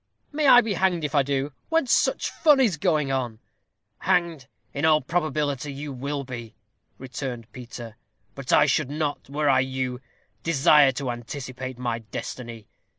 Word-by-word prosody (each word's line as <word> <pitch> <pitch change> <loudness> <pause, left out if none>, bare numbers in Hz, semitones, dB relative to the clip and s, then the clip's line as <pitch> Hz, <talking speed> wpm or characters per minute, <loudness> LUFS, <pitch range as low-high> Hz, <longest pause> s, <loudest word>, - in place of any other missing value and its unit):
"May 300 -1 +1
I 245 -2 +9
be 220 -3 -2
hanged 185 -3 +1
if 150 - -3
I 145 - +5
do, 140 +1 -2 0.2
when 325 -2 +2
such 245 - +1
fun 300 -4 +4
is 220 - +3
going 155 -5 +1
on." 125 -4 -2 0.6
"Hanged, 170 -7 0 0.3
in 145 - -4
all 155 -1 +5
probability, 150 -3 -1
you 140 +1 -6
will 140 +2 -4
be," 120 -4 -8 0.4
returned 125 -2 -6
Peter; 120 -2 -9 0.4
"but 135 -2 -5
I - - +6
should 155 -4 +1
not, 145 -2 -3
were 145 +1 -1
I 135 -2 +5
you, 130 -1 -2 0.4
desire 150 -3 +5
to 135 -1 -3
anticipate 130 +1 -6
my 120 -2 -2
destiny. 115 0 -7
140 Hz, 155 wpm, -25 LUFS, 125-155 Hz, 0.6 s, I